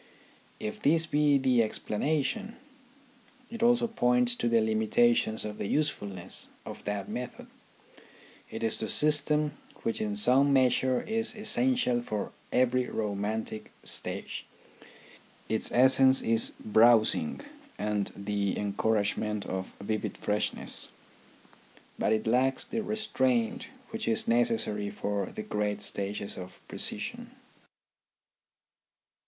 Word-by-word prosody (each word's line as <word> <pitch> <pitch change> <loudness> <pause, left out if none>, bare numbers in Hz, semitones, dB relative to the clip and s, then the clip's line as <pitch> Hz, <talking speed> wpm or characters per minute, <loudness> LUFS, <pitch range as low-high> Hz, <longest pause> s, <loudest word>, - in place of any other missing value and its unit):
If 105 - -5
this 165 +3 +3
be 150 -2 +3
the 130 -3 +3
explanation, 155 - -2 1.0
it 230 -1 -7
also 240 0 +4
points 125 - +2
to 120 -1 -1
the 115 0 +4
limitations 110 +1 +2
in 105 0 -5
the - - -2
usefulness 100 - -2 0.2
of - - -9
that 100 -2 -3
method. 125 0 -6 1.0
It 110 - -6
is 115 - -1
the 110 - -3
system 150 0 +2 0.3
which 115 - -2
in 105 -1 -2
some 130 +7 +6
measure 130 -1 +2
is 225 +2 0
essential 220 - +2
for 105 -3 -4 0.2
every 125 0 +2
romantic 110 +1 -3
stage. - - -3 1.0
Its 110 - 0
essence 130 +1 +5
is 115 0 +2
browsing 115 - +4 0.4
and 105 -1 -1
the 100 -1 -2
encouragement 105 0 -1
of 95 0 -5
vivid 110 +1 -3
freshness. 105 0 -1 1.1
But - - +1
it 110 0 +1
lacks 130 +4 +2
the 225 0 -3
restraint 230 +2 0 0.2
which 225 0 -4
is 225 0 0
necessary 230 - +1
for 100 0 -3
the 110 - -7
great 105 -1 -2
stages 100 0 -3
of 90 0 -9
precision. - - -4
120 Hz, 115 wpm, -29 LUFS, 105-150 Hz, 1.1 s, some